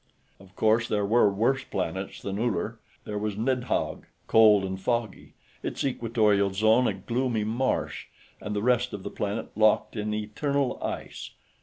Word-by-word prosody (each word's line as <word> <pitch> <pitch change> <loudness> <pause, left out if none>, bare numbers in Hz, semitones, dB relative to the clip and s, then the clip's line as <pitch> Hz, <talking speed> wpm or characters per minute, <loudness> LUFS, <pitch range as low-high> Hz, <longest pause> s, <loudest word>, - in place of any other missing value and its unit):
Of 95 0 -18
course, 110 +2 +2
there 105 -1 0
were 105 0 +4
worse 120 +7 +1
planets 95 +1 -4
than 100 +1 -3
Uller. 115 -3 -1 0.2
There 105 -1 -4
was 105 -1 -2
Nidhog, 125 +2 -1 0.2
cold 105 -3 +6
and 95 0 -5
foggy, 115 -2 -2 0.3
its - - -3
equatorial 110 -6 +2
zone 110 +4 +4
a - - +1
gloomy 115 +3 -1
marsh 120 +5 -1 0.3
and 105 - -4
the 105 - -1
rest 125 0 +2
of 100 -2 -6
the - - -5
planet 105 0 -4
locked 110 +1 +3
in 105 -1 -2
eternal 125 +6 -1
ice. - - -5
110 Hz, 155 wpm, -27 LUFS, 100-120 Hz, 0.3 s, cold